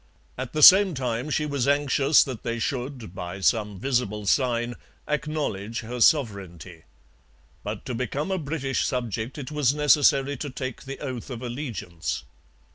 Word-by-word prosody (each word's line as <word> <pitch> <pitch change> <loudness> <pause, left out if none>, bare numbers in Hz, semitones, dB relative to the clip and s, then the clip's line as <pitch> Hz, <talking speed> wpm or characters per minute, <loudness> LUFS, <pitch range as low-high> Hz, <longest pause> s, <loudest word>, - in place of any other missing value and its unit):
At 130 -1 -6
the 155 -1 +1
same 190 0 +9
time 125 +1 -2
she 150 0 0
was 140 -3 -1
anxious 140 0 +4
that 130 -5 -6
they 115 0 -3
should, 125 -4 -4
by 90 0 -6
some 105 0 +1
visible 120 -4 -1
sign, 120 +1 +1 0.3
acknowledge 145 -9 -2
her 120 +2 -6
sovereignty. 95 - +1 0.8
But 105 0 -5
to 125 - -4
become 130 - -3
a 190 - 0
British 140 -4 -2
subject 120 0 -3
it 140 -1 -6
was 145 -2 +1
necessary 145 -2 +3
to 145 - -5
take 130 -1 -6
the 135 +1 -6
oath 130 -4 -5
of 125 -1 -6
allegiance. 120 - -4
125 Hz, 150 wpm, -25 LUFS, 115-145 Hz, 0.8 s, same